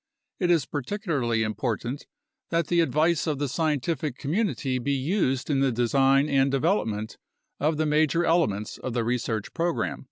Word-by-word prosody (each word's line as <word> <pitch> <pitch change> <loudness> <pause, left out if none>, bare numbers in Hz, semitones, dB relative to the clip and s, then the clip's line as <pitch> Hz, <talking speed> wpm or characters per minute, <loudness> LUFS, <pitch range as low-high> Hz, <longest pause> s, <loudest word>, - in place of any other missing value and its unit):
It 180 - +1
is 165 -6 +3
particularly 145 - -1
important 115 +5 -3 0.4
that 165 -2 0
the 175 - +3
advice 160 +2 +2
of 150 -3 0
the 145 +1 -1
scientific 150 -1 -1
community 150 - -1
be 140 +3 -1
used 135 -2 0
in 135 - +2
the 135 -1 +2
design 135 +4 +3
and 135 -2 +3
development 130 - -1 0.4
of 155 +1 +1
the 155 - +1
major 155 +3 +2
elements 110 - 0
of 130 - -4
the 120 -1 0
research 115 -3 -2
program. 170 0 -1
140 Hz, 155 wpm, -26 LUFS, 125-165 Hz, 0.4 s, is